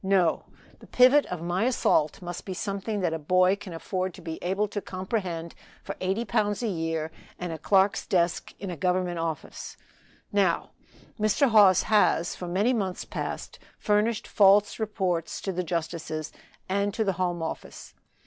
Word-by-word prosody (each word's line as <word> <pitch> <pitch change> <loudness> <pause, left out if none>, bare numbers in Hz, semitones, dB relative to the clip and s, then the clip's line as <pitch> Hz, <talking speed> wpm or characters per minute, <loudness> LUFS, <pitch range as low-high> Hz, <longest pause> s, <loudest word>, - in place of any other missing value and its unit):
No! 190 -4 +2 0.3
the - - -15
pivot 255 +4 +5
of 175 -2 -5
my 175 +5 0
assault 180 - +1
must 175 0 -6
be 190 - -5
something 200 +2 -3
that 175 -3 0
a 165 - -2
boy 185 +5 +3
can 200 -2 -10
afford 185 +2 -3
to - - -12
be 160 -1 -5
able 195 +4 0
to 205 0 -3
comprehend 185 -4 -4 0.3
for - - -5
eighty 190 +5 0
pounds 205 +2 0
a - - +1
year 165 -4 -2 0.3
and 175 -2 -4
a 160 - -7
clerk's 195 +4 +2
desk 175 -2 +1
in 195 -2 -5
a - - -4
Government 180 +1 0
office. 165 -2 -5 0.5
Now, 195 -4 +1 0.5
Mr. 215 +6 +3
Hawes 205 -5 +6
has, 205 -5 +2
for 180 - -6
many 200 +8 +2
months 195 -6 -2
past, - - -5 0.2
furnished 210 +1 +1
false 205 +1 +4
reports 185 -6 -1
to 195 - -2
the 180 0 -2
justices 160 -2 -3 0.4
and 200 +2 0
to 220 - +1
the 195 -2 0
Home 175 -2 -1
Office. 160 - -7
185 Hz, 165 wpm, -27 LUFS, 170-205 Hz, 0.5 s, Hawes